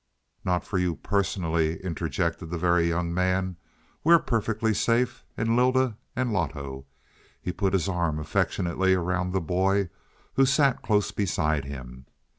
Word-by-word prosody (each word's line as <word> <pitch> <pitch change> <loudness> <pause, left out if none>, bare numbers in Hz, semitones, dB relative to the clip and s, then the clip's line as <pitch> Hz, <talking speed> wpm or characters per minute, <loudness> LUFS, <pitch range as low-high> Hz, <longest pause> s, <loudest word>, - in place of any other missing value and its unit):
"Not 90 -1 0
for 95 - -1
you 90 -2 0
personally," 85 -5 0
interjected 85 0 -2
the 85 - -3
Very 85 0 +3
Young 85 0 -1
Man. 90 0 0 0.5
"We're 170 +2 +7
perfectly 115 -5 0
safe 115 +4 +1
and 115 0 +1
Lylda, 130 -1 +3 0.2
and 125 -2 0
Loto." 70 -6 -3 0.5
He 90 - -3
put 95 +1 -1
his 90 -4 +1
arm 85 -5 0
affectionately 90 +4 +1
around 90 0 -1
the 95 0 0
boy 95 +3 +1 0.4
who 135 - +4
sat 140 -1 +3
close 105 -2 +1
beside 80 -7 0
him. 65 -2 -9
90 Hz, 140 wpm, -26 LUFS, 85-105 Hz, 0.5 s, We're